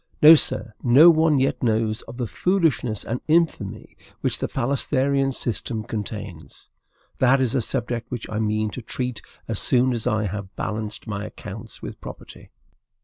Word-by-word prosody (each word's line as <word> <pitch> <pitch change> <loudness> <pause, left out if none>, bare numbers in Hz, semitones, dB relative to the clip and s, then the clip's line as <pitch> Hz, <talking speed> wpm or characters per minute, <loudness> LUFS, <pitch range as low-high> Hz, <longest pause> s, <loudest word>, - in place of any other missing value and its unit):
No, 155 +2 +10
sir; 120 -7 +2
no 140 +8 +7
one 160 -2 +3
yet 135 - 0
knows 110 -2 0
of 120 - -10
the 125 - -2
foolishness 155 - 0
and 120 +2 -3
infamy 160 - 0 0.3
which - - +1
the - - -1
phalansterian 135 +1 0
system 115 -3 -2
contains. 105 -5 -7 0.5
That 130 +1 +4
is 130 -3 0
a 130 - +1
subject 120 0 -3
which 125 -3 -5
I 105 - -4
mean 110 0 -1
to 125 - -7
treat 125 0 -4 0.3
as 110 -3 -1
soon 130 0 +4
as 115 -2 -3
I 110 0 0
have 100 0 -6
balanced 110 0 -4
my 105 -3 -4
accounts - - -9
with - - -8
property. - - -11
120 Hz, 160 wpm, -23 LUFS, 110-135 Hz, 0.5 s, No